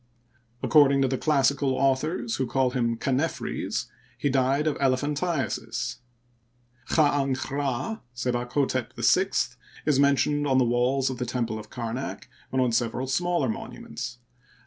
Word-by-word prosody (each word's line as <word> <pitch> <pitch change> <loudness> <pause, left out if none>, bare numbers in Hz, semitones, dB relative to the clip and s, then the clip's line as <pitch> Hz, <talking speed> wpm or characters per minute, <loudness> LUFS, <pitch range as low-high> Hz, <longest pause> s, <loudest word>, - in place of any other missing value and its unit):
According 140 -3 +5
to - - +3
the 130 0 -1
classical 140 -2 +2
authors, 150 - 0
who 130 - -1
call 130 +1 +1
him 115 -2 0
Chanephres, 135 +6 -1 0.3
he 145 - 0
died 135 +3 +2
of 155 - +1
elephantiasis. 140 -3 -1 0.9
Chd'dnch'Rd, 140 - 0 0.2
SebakhStep 125 +1 -1
VI, - - +2 0.3
is 145 -3 +3
mentioned 145 +1 +3
on 130 -1 +3
the 130 - +4
walls 125 +3 +1
of 125 - -6
the 125 - -1
temple 115 -2 -2
of 110 - -11
Kamak 120 +2 -5 0.2
and 130 - 0
on 125 -2 +2
several 120 +2 0
smaller 170 +2 +1
monuments. 120 +1 -6
135 Hz, 125 wpm, -26 LUFS, 125-145 Hz, 0.9 s, According